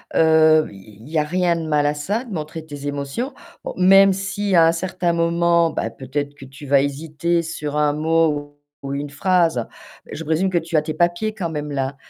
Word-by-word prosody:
Heu, 160 -1 +5
il 105 +4 -15
y 160 - -2
a 150 - +3
rien 175 +2 +1
de 165 -1 -4
mal 150 -1 +2
à 145 - +2
ça, 205 - -3
de 225 - -8
montrer 155 -1 -6
tes 145 -2 -7
émotions. 145 - -4 0.3
Bon, - - -5
même 195 +2 +6
si 195 +1 -2
à 165 -1 +7
un - - +4
certain 180 0 -1
moment, 170 0 +2
bah, 115 - -2
peut-être 140 +4 -5
que 135 - -12
tu 135 +2 -12
vas 140 0 +4
hésiter 155 +4 -1
sur 150 -3 -5
un 150 -1 +2
mot 150 -2 0 0.2
ou 140 0 -4
une 145 +1 -4
phrase, 165 - +1 0.5
je 165 - -6
présume 160 +5 +1
que 180 - 0
tu 165 0 -3
as 155 - +5
tes 155 0 -4
papiers 175 +6 0
quand 185 -6 -4
même 150 -1 -5
là. 135 0 -2
160 Hz, 210 wpm, -21 LUFS, 145-175 Hz, 0.5 s, à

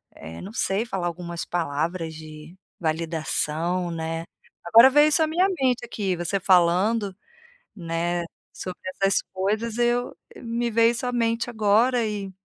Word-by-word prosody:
eh 80 +1 -9
não 200 +4 -9
sei 200 0 0
falar 190 -6 -3
algumas 170 0 -5
palavras 165 +1 -2
de 155 +1 -11 0.2
validação, 165 +1 -1
né. 165 0 -4 0.4
Agora 230 +8 +8
veio 295 +2 +5
isso 320 - +2
a - - +1
minha 345 +4 +2 0.2
mente, 250 -2 +1
aqui, 200 -5 -2
você 175 +3 -1
falando, 185 +3 +3 0.6
né, 170 -1 -2 0.3
sobre 185 -1 -7
essas 195 +1 +1
coisas, 215 +4 -1
eu 240 0 0 0.2
me 235 0 -2
veio 230 +1 +4
isso 240 +1 -4
a - - -1
mente 230 -1 0
agora 230 +2 +2
e 200 -2 -4
190 Hz, 145 wpm, -24 LUFS, 170-230 Hz, 0.6 s, Agora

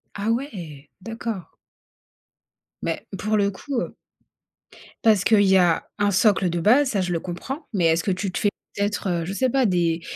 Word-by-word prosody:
Ah 205 +2 -2
ouais. 175 - -4
D'accord. 225 -2 -6 1.3
Mais, - - -3
pour 215 +3 0
le 200 0 +2
coup, 250 +6 -4
heu - - -6 1.1
Parce 210 -4 +5
qu'il 215 -2 +5
y 190 -1 +5
a 175 -2 +2
un 205 0 +2
socle 195 -2 +3
de 170 0 -1
base, 255 - +4
ça, 205 -6 0
je 180 -1 -2
le 165 - 0
comprends. 255 - -6
Mais 180 -4 +1
est-ce 165 0 +3
que 195 - 0
tu 185 +1 -2
te - - -4
fais 205 - +2 0.3
peut-être, 205 0 -1
heu, 170 -2 -1
je 190 - -4
sais 260 +5 +1
pas 265 0 +2
des 170 -4 +1
200 Hz, 190 wpm, -23 LUFS, 175-220 Hz, 1.3 s, Parce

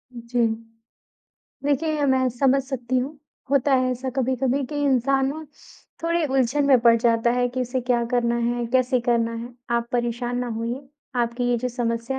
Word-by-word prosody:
उ, - - -6
जी। 240 -1 +3 1.2
देखिए, 290 +3 +1
ये 295 - 0
मैं 260 -1 +3
समझ 270 +3 +2
सकती 255 -2 -3
हूँ। 280 +4 -4 0.3
होता 280 0 +3
है 255 -1 +2
ऐसा 255 +1 -3
कभी-कभी 260 +1 +1
कि 295 - -6
इंसान 270 0 +2
ना 310 +4 -4 0.6
थोड़े 335 0 +1
उलझन 270 +1 +1
में 270 -2 +6
पड़ 235 0 +6
जाता 230 0 +2
है 245 0 +1
कि 250 +1 -4
इसे 250 +1 -1
क्या 245 -1 +1
करना 235 -1 +2
है, 240 0 0
कैसे 255 +1 +2
करना 235 -1 +1
है। 235 +2 -7 0.2
आप 235 0 -2
परेशान 240 0 -1
ना 250 - -2
होइए, 235 +3 -3 0.4
आपकी 235 +1 -1
ये 240 - +2
जो 250 +2 -2
समस्या 240 +1 -2
250 Hz, 180 wpm, -23 LUFS, 235-265 Hz, 1.2 s, में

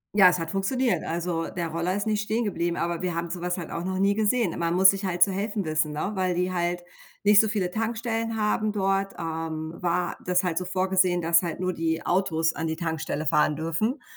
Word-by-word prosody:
Ja, 190 -3 +8
es 180 - 0
hat 165 -1 -4
funktioniert. 240 +6 0
Also, 170 0 -2
der 170 -2 -3
Roller 170 +3 -1
ist 205 - -2
nicht 215 -1 0
stehengeblieben, 205 -6 -1
aber 170 0 -2
wir 180 -2 -2
haben 170 0 -3
so 175 -1 -5
was 180 +1 -1
halt 170 -3 -6
auch 170 - -4
noch 185 +1 -2
nie 195 +1 +3
gesehen. 215 -3 +1
Man 170 0 0
muss 190 +1 +8
sich 195 0 -4
halt 175 -1 +4
zu 195 - +1
helfen 205 +1 -2
wissen, 155 -1 0
ne, 155 +7 -2
weil 185 -2 0
die 180 +1 -1
halt 175 0 -1 0.4
nicht 205 0 +7
so 220 - 0
viele 200 -4 -1
Tankstellen 225 0 -2
haben 215 0 +1
dort, 195 -1 0
ähm, 160 -1 -4
war 175 0 -1
das 180 0 +1
halt 180 -1 0
so 180 - -5
vorgesehen, 185 -1 +1
dass 170 +1 +4
halt 170 -1 -4
nur 185 0 -1
die 160 0 -2
Autos 165 -3 +1
an 165 - -3
die 160 - -2
Tankstelle 160 -2 -3
fahren 150 +1 +2
dürfen 165 - -2
180 Hz, 225 wpm, -26 LUFS, 165-200 Hz, 0.4 s, Ja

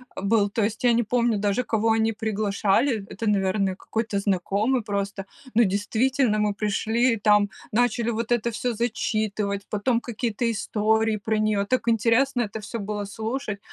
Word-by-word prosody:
был. 205 +1 +1
То 215 +1 -1
есть 220 +3 -2
я 240 -1 +5
не 235 +1 +2
помню 235 -1 +1
даже, 205 +4 0
кого 225 -1 0
они 225 0 +2
приглашали. 210 +2 0
Это, 225 - -5
наверное, 195 -1 +1
какой-то 220 +1 -3
знакомый 200 +6 0
просто. 200 -1 -3 0.3
Ну, 235 - +6
действительно, 220 +4 +1
мы 210 -1 +1
пришли 220 +4 +1
и - - -2
там 210 -1 +3 0.2
начали 235 0 +1
вот 230 +1 -3
это 235 0 +2
всё 235 +2 -2
зачитывать, 215 -3 -1
потом 230 +3 +1
какие-то 235 0 -3
истории 220 -1 +1
про 220 +1 -1
неё, 210 -2 +1
так 240 0 -1
интересно 235 +3 +2
это 220 +1 -5
всё 230 +2 -6
было 205 0 -4
слушать. 220 +1 -4
220 Hz, 160 wpm, -24 LUFS, 205-235 Hz, 0.3 s, Ну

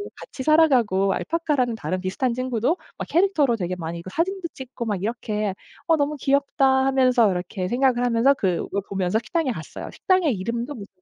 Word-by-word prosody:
같이 - - -9
살아가고 250 -11 +3
알파카라는 295 -8 0
다른 185 -4 -3
비슷한 190 +7 -1
친구도 255 +5 0 0.2
막 - - -4
캐릭터로 330 -9 +2
되게 185 -2 -3
많이 170 -1 -5
그 185 - -9
사진도 355 - -2
찍고 255 -2 -7
막 205 -4 -1
이렇게 215 -2 -2 0.3
'어 330 - +4
너무 295 0 0
귀엽다.' 280 0 +1 0.2
하면서 255 -4 +4
이렇게 180 +1 -3
생각을 245 +2 +2
하면서 245 +3 +4
그 185 -9 0
그걸 200 - -3
보면서 190 +1 0
식당에 280 +5 -1
갔어요. 160 -9 -7
식당의 370 -7 +2
이름도 235 +7 -3
무슨 205 -7 -9
240 Hz, 415 characters per minute, -23 LUFS, 200-280 Hz, 0.3 s, 어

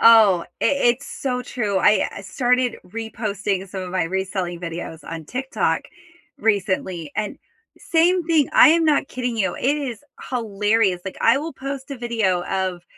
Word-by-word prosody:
Oh, 215 -6 +7 0.2
it - - +3 0.3
it's 280 - -12
so 250 -2 -3
true. 210 -7 -1
I 210 +2 +4
I - - -7
started 245 +4 +1
reposting 205 -2 -3
some 190 0 -5
of 180 - -6
my 180 -2 0
reselling 185 -1 -3
videos 165 -2 -6
on 165 -1 -6
TikTok 265 - -1 0.6
recently, 185 -6 -1
and 215 -1 -2 0.4
same 345 +1 +2
thing, 320 -5 +3
I - - +8
am 330 +1 +4
not 300 -3 +2
kidding 250 -2 -3
you, 190 -4 0
it 280 +4 +1
is 265 -6 -5 0.3
hilarious, 210 -4 +1
like 190 - -6
I - - +5
will 315 +3 -5
post 275 0 -6
a 275 - -5
video 220 -7 0
of 185 -2 -2
215 Hz, 160 wpm, -22 LUFS, 185-255 Hz, 0.6 s, I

